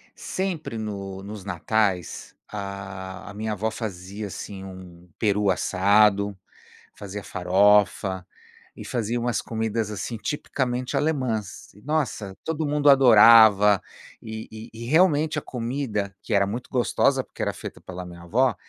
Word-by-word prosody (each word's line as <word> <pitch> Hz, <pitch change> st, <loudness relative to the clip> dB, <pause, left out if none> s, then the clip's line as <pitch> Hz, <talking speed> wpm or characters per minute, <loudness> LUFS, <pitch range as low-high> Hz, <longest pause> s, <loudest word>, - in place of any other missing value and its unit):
sempre 180 Hz, -10 st, -4 dB
no 100 Hz, -3 st, -5 dB
nos 105 Hz, 0 st, -8 dB
natais, 100 Hz, -3 st, -1 dB
a 100 Hz, -1 st, -7 dB
a -, -, -9 dB
minha 110 Hz, +2 st, -3 dB
avó 105 Hz, +2 st, -1 dB
fazia, 100 Hz, -1 st, -6 dB
assim, 95 Hz, 0 st, -7 dB
um 90 Hz, -2 st, -11 dB
peru 105 Hz, -1 st, +2 dB
assado, 100 Hz, +2 st, +3 dB, 0.6 s
fazia 100 Hz, 0 st, -7 dB
farofa, 95 Hz, 0 st, +2 dB, 0.5 s
e -, -, -9 dB
fazia 120 Hz, 0 st, -2 dB
umas 120 Hz, 0 st, -1 dB
comidas 110 Hz, -1 st, -2 dB
assim 105 Hz, +3 st, -4 dB
tipicamente 125 Hz, 0 st, -2 dB
alemãs, 130 Hz, -, -2 dB
e 105 Hz, -, -18 dB
nossa, 130 Hz, -10 st, -2 dB
todo 160 Hz, -1 st, -2 dB
mundo 145 Hz, 0 st, +3 dB
adorava, 110 Hz, -6 st, +7 dB, 0.4 s
e 110 Hz, 0 st, -7 dB
e 110 Hz, +2 st, -9 dB
e 115 Hz, +1 st, -8 dB
realmente 155 Hz, 0 st, +3 dB
a -, -, -13 dB
comida, 115 Hz, -6 st, -3 dB
que 115 Hz, -, -3 dB
era 100 Hz, -1 st, +3 dB
muito 115 Hz, +5 st, -5 dB
gostosa 125 Hz, -2 st, +2 dB
porque -, -, -11 dB
era -, -, 0 dB
feita -, -, -9 dB
pela 90 Hz, 0 st, -8 dB
minha 85 Hz, -1 st, -11 dB
avó, 120 Hz, +7 st, +2 dB
105 Hz, 140 wpm, -24 LUFS, 100-120 Hz, 0.6 s, adorava